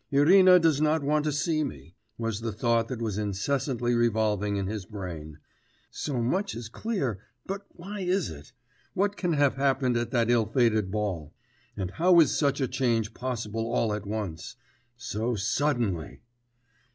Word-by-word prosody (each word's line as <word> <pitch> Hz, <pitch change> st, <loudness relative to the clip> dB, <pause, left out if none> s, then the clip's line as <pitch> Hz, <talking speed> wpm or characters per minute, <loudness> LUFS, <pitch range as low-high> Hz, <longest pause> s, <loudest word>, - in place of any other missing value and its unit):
'Irina 180 Hz, +6 st, +7 dB
does 160 Hz, -4 st, +3 dB
not 155 Hz, 0 st, +2 dB
want 150 Hz, +1 st, +1 dB
to 150 Hz, -, +1 dB
see 155 Hz, +2 st, 0 dB
me,' 110 Hz, -, -7 dB, 0.2 s
was 115 Hz, -2 st, -3 dB
the 115 Hz, -1 st, -2 dB
thought 115 Hz, +2 st, +1 dB
that 120 Hz, -2 st, -4 dB
was 105 Hz, -2 st, -2 dB
incessantly 120 Hz, +4 st, -1 dB
revolving 110 Hz, -3 st, +1 dB
in 100 Hz, -1 st, -1 dB
his 105 Hz, 0 st, -4 dB
brain; 85 Hz, -7 st, -7 dB, 0.5 s
'so 130 Hz, -5 st, -2 dB
much 195 Hz, -, -1 dB
is 115 Hz, -1 st, -6 dB
clear; 135 Hz, -, -2 dB, 0.3 s
but 195 Hz, +1 st, -5 dB
why 200 Hz, +4 st, -8 dB
is 185 Hz, -, 0 dB
it? 75 Hz, +6 st, -11 dB, 0.4 s
What 200 Hz, +2 st, +1 dB
can 180 Hz, -4 st, -1 dB
have 145 Hz, -3 st, +2 dB
happened 135 Hz, -2 st, +1 dB
at 120 Hz, 0 st, -1 dB
that 120 Hz, -1 st, +2 dB
ill 115 Hz, -3 st, +3 dB
fated 110 Hz, -4 st, +2 dB
ball? 95 Hz, -7 st, -3 dB, 0.4 s
And 95 Hz, -1 st, -3 dB
how 175 Hz, -, +5 dB
is 155 Hz, -5 st, +4 dB
such 140 Hz, -2 st, +1 dB
a 135 Hz, -, +1 dB
change 120 Hz, -4 st, 0 dB
possible 115 Hz, -3 st, -3 dB
all 115 Hz, -3 st, +1 dB
at 105 Hz, -1 st, -5 dB
once? 100 Hz, -7 st, -5 dB, 0.4 s
So 120 Hz, -1 st, -2 dB
suddenly.... 110 Hz, -, -1 dB
120 Hz, 165 wpm, -27 LUFS, 105-145 Hz, 0.5 s, Irina